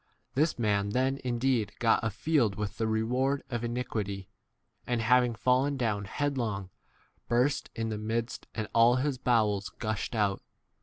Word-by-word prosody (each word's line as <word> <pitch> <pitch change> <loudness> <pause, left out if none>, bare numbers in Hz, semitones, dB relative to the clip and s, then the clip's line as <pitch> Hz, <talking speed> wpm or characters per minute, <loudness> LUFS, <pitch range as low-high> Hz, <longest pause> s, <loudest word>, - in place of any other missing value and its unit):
(This 155 +5 +1
[man] 100 -3 +1
then 130 +5 +1
indeed 120 -3 0
got 115 -2 +3
k 115 - 0
a - - 0
field 115 0 +1
with 105 -1 -4
[the] 115 - +1
1 - - 0
reward 125 +5 +1
of 120 -1 -2
iniquity, 110 -5 -3 0.6
and, 120 -1 0
having 120 +1 +3
fallen 130 +4 +2
down 105 -5 -1
headlong, 110 -7 -2 0.6
burst 125 +5 +1
in 115 0 -2
the 105 -1 -3
midst, 115 +2 -3
and 110 -2 -2
all 115 +1 +6
his 130 0 -1
bowels 105 -5 +2
19 - - -38
gushed 110 0 -2
out. 105 -3 +1
115 Hz, 165 wpm, -29 LUFS, 105-125 Hz, 0.6 s, all